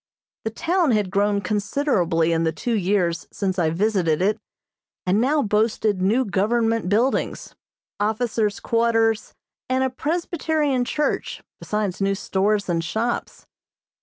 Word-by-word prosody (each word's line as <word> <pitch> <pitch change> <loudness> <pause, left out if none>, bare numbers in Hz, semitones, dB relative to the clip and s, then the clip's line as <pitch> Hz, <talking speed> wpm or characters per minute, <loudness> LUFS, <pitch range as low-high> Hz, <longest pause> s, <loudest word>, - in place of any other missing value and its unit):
The - - +1
town 335 +8 +1
had 205 -4 0
grown 200 0 +1
considerably 200 - +1
in 165 0 +1
the 160 - +1
two 195 +10 -3
years 180 -5 0
since 190 -2 -2
I 165 -2 +2
visited 175 -3 +1
it, 205 +4 +1 0.7
and 190 +4 +2
now 285 +3 +2
boasted 210 -2 +1
new 225 +8 +2
government 225 +1 +1
buildings, 230 +7 0 0.5
officer's 215 0 0
quarters, 225 -1 +1 0.3
and 260 0 +2
a 260 - 0
Presbyterian 305 -2 -1
church, 300 +4 -2 0.2
besides 210 -3 -2
new 195 0 +2
stores 200 +1 0
and 170 -2 0
shops. 225 +8 -3
210 Hz, 130 wpm, -23 LUFS, 190-240 Hz, 0.7 s, I